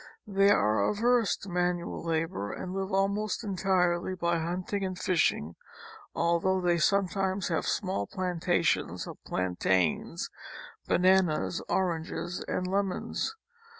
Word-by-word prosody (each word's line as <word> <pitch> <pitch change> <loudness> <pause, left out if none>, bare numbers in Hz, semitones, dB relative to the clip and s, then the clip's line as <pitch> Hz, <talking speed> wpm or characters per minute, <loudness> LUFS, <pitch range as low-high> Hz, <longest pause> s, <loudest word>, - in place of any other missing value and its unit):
They 195 -1 +3
are 105 - +3
averse 230 - +2
to 200 - -10
manual 175 -1 -1
labor 165 - -2
and 185 - -5
live 195 +1 -3
almost 200 +4 0
entirely 185 -2 +1
by 170 -1 0
hunting 180 +4 -2
and 185 -1 -3
fishing, 155 - +1 0.6
although 170 +3 +2
they 175 -1 +2
sometimes 195 +1 +1
have 165 - -1
small 185 - -1
planta 180 -1 0
tions - - 0
of - - -10
plantains, 90 -2 0 0.6
bananas, 180 -2 +3
oranges 175 -1 -1
and 185 - -1
lemons. 195 - -1
180 Hz, 115 wpm, -29 LUFS, 170-195 Hz, 0.6 s, They